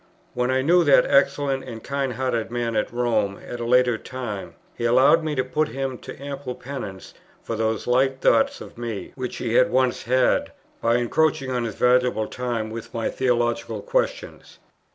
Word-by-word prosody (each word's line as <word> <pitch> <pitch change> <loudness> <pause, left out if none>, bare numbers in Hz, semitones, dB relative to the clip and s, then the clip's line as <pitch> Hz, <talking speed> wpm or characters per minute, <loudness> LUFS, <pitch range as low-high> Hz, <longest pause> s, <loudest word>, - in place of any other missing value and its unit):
When 125 0 0
I 130 0 +1
knew 175 +4 +5
that 140 -2 +6
excellent 140 -1 +2
and 115 -3 -8
kind 140 -2 -2
hearted 120 -2 -1
man 120 -1 -2
at 105 - 0
Rome 110 -5 0
at 120 - -6
a 120 - -3
later 125 -1 +3
time, 120 -6 -6 0.2
he - - -6
allowed 130 +7 +5
me 155 -1 -2
to 130 - +1
put 150 +4 0
him 135 -3 -4
to - - -10
ample 140 -2 -6
penance 120 -8 -7 0.3
for 115 - -4
those 110 -1 -1
light 130 +2 +2
thoughts 275 - +3
of - - -11
me, 115 -4 -5
which 130 -2 -5
he 115 -2 -2
had 170 +7 +5
once 130 -4 +1
had, 125 +2 +2 0.3
by 115 +1 +2
encroaching 135 +3 +1
on 125 -2 -1
his 110 - -5
valuable 125 -3 +2
time 115 -2 -3
with 115 +1 -8
my 115 - -1
theological 120 -2 -1
questions. - - -3
125 Hz, 180 wpm, -23 LUFS, 115-135 Hz, 0.3 s, that